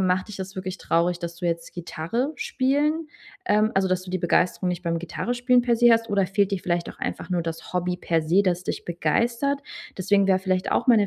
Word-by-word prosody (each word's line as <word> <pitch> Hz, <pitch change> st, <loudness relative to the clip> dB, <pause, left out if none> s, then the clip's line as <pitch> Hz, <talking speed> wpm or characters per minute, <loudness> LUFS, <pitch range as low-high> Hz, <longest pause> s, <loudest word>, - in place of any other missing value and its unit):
„Macht 185 Hz, 0 st, +1 dB
dich 210 Hz, -, -7 dB
das 190 Hz, +1 st, -7 dB
wirklich 185 Hz, 0 st, -5 dB
traurig, 170 Hz, +1 st, +1 dB
dass 170 Hz, 0 st, -5 dB
du 175 Hz, -, -3 dB
jetzt 170 Hz, 0 st, -2 dB
Gitarre 180 Hz, -, -3 dB
spielen 300 Hz, -, 0 dB, 0.4 s
ähm, 215 Hz, +1 st, +3 dB
also, 195 Hz, 0 st, +3 dB
dass 185 Hz, 0 st, 0 dB
du 185 Hz, -, -9 dB
die 185 Hz, -, -1 dB
Begeisterung 180 Hz, +2 st, +1 dB
nicht 180 Hz, 0 st, -3 dB
beim 170 Hz, -1 st, -1 dB
Gitarrenspielen 245 Hz, +7 st, +1 dB
per 235 Hz, -1 st, +2 dB
se 240 Hz, 0 st, +6 dB
hast 230 Hz, 0 st, +2 dB
oder 200 Hz, -2 st, +2 dB
fehlt 200 Hz, +1 st, +1 dB
dir 195 Hz, -, +1 dB
vielleicht 175 Hz, -1 st, -1 dB
auch -, -, -15 dB
einfach -, -, -4 dB
nur 175 Hz, -2 st, +1 dB
das 165 Hz, +1 st, -6 dB
Hobby 180 Hz, 0 st, 0 dB
per 165 Hz, -2 st, 0 dB
se, 175 Hz, +6 st, +3 dB
das 180 Hz, -1 st, 0 dB
dich -, -, -4 dB
begeistert?“ 235 Hz, -, 0 dB, 0.4 s
Deswegen 200 Hz, +1 st, +3 dB
wäre 190 Hz, -, +4 dB
vielleicht 185 Hz, -1 st, 0 dB
auch -, -, +1 dB
meine 215 Hz, -4 st, +6 dB
185 Hz, 220 wpm, -24 LUFS, 175-230 Hz, 0.4 s, se